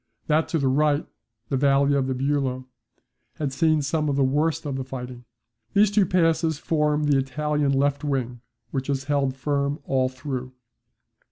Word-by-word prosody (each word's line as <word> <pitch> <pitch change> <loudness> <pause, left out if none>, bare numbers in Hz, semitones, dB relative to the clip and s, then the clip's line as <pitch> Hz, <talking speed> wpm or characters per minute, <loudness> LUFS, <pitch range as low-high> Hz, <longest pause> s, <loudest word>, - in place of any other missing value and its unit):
That 155 +1 +2
to 165 - -1
the 140 -3 +1
right, 145 +2 +2 0.4
the 135 - 0
Valley 140 +1 +3
of 140 -2 +2
Buello, 130 -1 -1 0.7
has 145 -3 -3
seen 155 +1 +2
some 150 +1 0
of 140 - 0
the 140 - +2
worst 150 +5 0
of 140 -2 -3
the 135 - -3
fighting. 125 -1 -8 0.5
These 205 0 +5
two 205 -3 +3
passes 165 -3 +2
form 150 -1 0
the 145 -2 +3
Italian 150 +2 0
left 140 +1 +1
wing 125 -4 -2 0.3
which 135 -1 -3
has 135 -2 -1
held 140 -2 0
firm 140 +1 -1
all 130 -1 +1
through. 130 -1 -6
140 Hz, 165 wpm, -24 LUFS, 130-150 Hz, 0.7 s, These